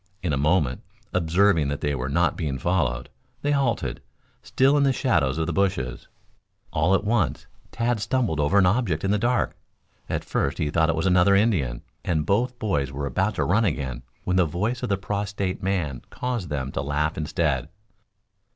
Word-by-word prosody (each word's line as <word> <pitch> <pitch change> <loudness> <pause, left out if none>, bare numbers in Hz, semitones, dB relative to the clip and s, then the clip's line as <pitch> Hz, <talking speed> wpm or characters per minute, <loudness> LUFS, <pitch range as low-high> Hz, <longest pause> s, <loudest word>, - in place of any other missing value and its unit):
In 85 -5 0
a - - +3
moment, 75 -2 +1 0.3
observing 85 -2 +3
that 70 0 -3
they 75 0 0
were 65 -1 -3
not 85 +4 +2
being 75 -5 -2
followed, 65 -5 0 0.4
they 145 - +1
halted, 135 -5 0 0.4
still 135 +2 +3
in 145 - +3
the 140 -1 +4
shadows 85 - +1
of 80 - 0
the 85 - -2
bushes. 85 -10 -1 0.7
All 80 +6 +3
at 95 - 0
once 110 -1 0 0.3
Tad 120 0 0
stumbled 110 - 0
over 75 +7 +2
an 100 - +6
object 90 -5 +1
in 95 - +1
the 105 - +2
dark. 120 +2 +1 0.5
At - - -2
first - - -1
he 75 - -1
thought 80 0 +2
it 80 - +2
was 80 - -1
another 95 +1 +5
Indian, 85 - +1 0.2
and 80 -3 0
both 120 +5 +1
boys 75 - -1
were 70 +1 -4
about 95 +9 0
to - - 0
run 105 +6 +2
again, 65 - -2 0.2
when 90 0 0
the 90 - +5
voice 105 +10 -2
of - - -2
the 100 - +2
prostrate 100 -1 -3
man 90 -9 -1
caused 120 -9 -3
them 70 -2 -3
to - - -2
laugh 75 +2 -1
instead. 75 -3 -1
90 Hz, 190 wpm, -25 LUFS, 75-105 Hz, 0.7 s, an